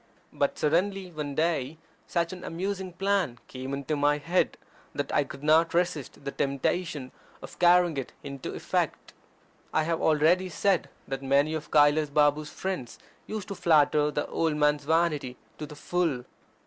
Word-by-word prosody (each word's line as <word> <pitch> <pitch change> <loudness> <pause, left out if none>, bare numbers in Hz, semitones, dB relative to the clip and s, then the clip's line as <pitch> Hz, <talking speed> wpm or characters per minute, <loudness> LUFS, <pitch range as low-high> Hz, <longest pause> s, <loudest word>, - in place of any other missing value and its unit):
But 140 - 0
suddenly 185 +4 0
one 150 -3 -5
day 160 -2 0 0.3
such 170 0 -1
an 180 - -9
amusing 190 +2 -3
plan 195 -9 0
came 130 +1 -6
into 140 +2 -2
my 145 0 +2
head, 170 +5 0 0.4
that - - -3
I - - +4
could 140 - -11
not 160 +2 +4
resist 165 -6 -1
the 140 - -2
temptation 140 0 -2 0.3
of - - -11
carrying 175 -2 +5
it 135 - -4
into 140 -1 -6
effect. - - -2 0.6
I 155 - +2
have 165 +1 -1
already 160 +4 +3
said 190 +1 +1 0.2
that 135 0 -4
many 140 +3 +2
of 155 -1 -5
Kailas 150 0 +4
Babu's 150 +1 +2
friends 185 -11 -4 0.3
used 215 -3 -5
to - - -3
flatter 150 -4 +3
the 145 0 -2
old 160 -2 0
man's 150 -1 +2
vanity 155 -5 +1 0.2
to 150 - -5
the 150 - -10
full. 160 -5 -1
155 Hz, 160 wpm, -28 LUFS, 145-175 Hz, 0.6 s, carrying